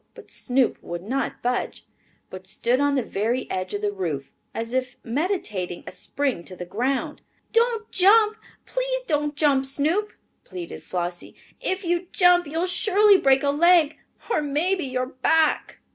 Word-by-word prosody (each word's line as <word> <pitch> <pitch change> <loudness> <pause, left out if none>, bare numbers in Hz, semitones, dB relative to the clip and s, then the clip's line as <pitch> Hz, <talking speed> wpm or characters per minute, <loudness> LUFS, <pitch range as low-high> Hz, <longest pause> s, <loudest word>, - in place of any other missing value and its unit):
But - - -14
Snoop 255 -1 0
would 175 0 -6
not 260 +7 -3
budge, 245 +1 -2 0.5
but 185 0 -9
stood 235 +5 0
on 285 0 +2
the 260 - +1
very 230 +6 -1
edge 185 +1 -3
of 205 - -5
the 205 - +1
roof, 165 -9 -4 0.2
as 230 +1 -5
if 255 -1 -2
meditating 230 - -2
a - - -7
spring 245 +2 -2
to 185 - -8
the 180 - -7
ground. 250 +9 -2 0.3
"Don't 460 -1 +1
jump, 425 +3 +5 0.3
please - - -2
don't 295 -6 -1
jump, 280 -3 +2
Snoop!" 320 +10 0 0.3
pleaded 180 -3 -8
Flossie. 175 -1 -5 0.2
"If 375 +1 -2
you 350 +1 0
jump 355 -2 +4
you'll 325 +4 -1
surely 405 +2 +4
break 270 0 +4
a 280 - +3
leg, 325 0 +4 0.3
or - - +2
maybe 310 +5 0
your 255 -1 -2
back!" 305 +5 +1
275 Hz, 160 wpm, -24 LUFS, 215-355 Hz, 0.5 s, jump